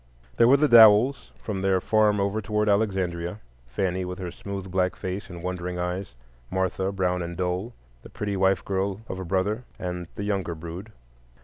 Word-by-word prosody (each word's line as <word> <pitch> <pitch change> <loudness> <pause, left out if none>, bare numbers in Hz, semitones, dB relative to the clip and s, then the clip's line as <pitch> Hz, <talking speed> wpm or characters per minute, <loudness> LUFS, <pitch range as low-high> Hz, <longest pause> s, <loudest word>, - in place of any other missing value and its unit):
There 115 - +6
were 135 +3 +7
the 150 +2 +3
Dowells 115 +2 +6
from 100 -3 -4
their 95 -1 +2
farm 105 +1 +2
over 100 +2 0
toward 105 +1 0
Alexandria,—Fanny, 90 - -1
with 90 0 -5
her 90 -3 -5
smooth 95 -1 -7
black 90 0 +1
face 95 +2 -5
and 85 -2 -9
wondering 90 -1 -3
eyes; 90 -4 -3 0.3
Martha, 95 +1 -1
brown 90 -2 0
and 85 0 -5
dull; 95 +5 -2 0.3
the - - -13
pretty 105 -1 -4 0.3
girl 95 0 0
wife 110 - -16
of 95 - -5
a 95 - -5
brother, 100 +6 0
and 90 -1 -5
the 100 - -4
younger 95 -4 -2
brood. 85 +6 -8
95 Hz, 175 wpm, -25 LUFS, 90-105 Hz, 0.3 s, were